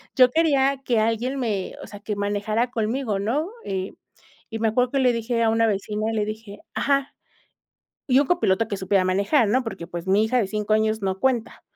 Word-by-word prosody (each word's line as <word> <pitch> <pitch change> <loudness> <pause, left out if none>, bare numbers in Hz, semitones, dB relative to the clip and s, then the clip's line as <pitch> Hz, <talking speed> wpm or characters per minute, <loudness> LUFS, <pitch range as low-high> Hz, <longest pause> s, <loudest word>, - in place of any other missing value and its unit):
yo 255 -2 +6
quería 275 -2 +2
que 235 -3 +2
alguien 230 +5 0
me 210 -7 -2
o - - -9
sea, 205 - -10
que 210 0 -4
manejara 205 +4 -1
conmigo, 225 -1 -1
¿no? 255 - -1 0.2
Eh, 190 0 -3 0.6
y 225 - -5
me 225 - +1
acuerdo 245 +3 +1
que 275 - +1
le 250 -2 +3
dije 230 0 -1
a 225 - +3
una 225 +1 +2
vecina, 210 +1 -2
le 215 -2 0
dije 215 -1 -7
ajá, 275 -1 0 0.9
y 260 -1 +5
un 285 - +1
copiloto 225 - +2
que 200 - -2
supiera 190 0 +1
manejar, 200 +6 +2
¿no? 255 +4 +2
Porque, 195 -6 -6
pues, 175 +1 -7
mi 200 +3 +4
hija 220 +3 +1
de 210 - 0
5 210 +1 -3
años 220 0 +1
no 190 -1 -2
cuenta. 245 -2 -1
220 Hz, 205 wpm, -23 LUFS, 205-250 Hz, 0.9 s, yo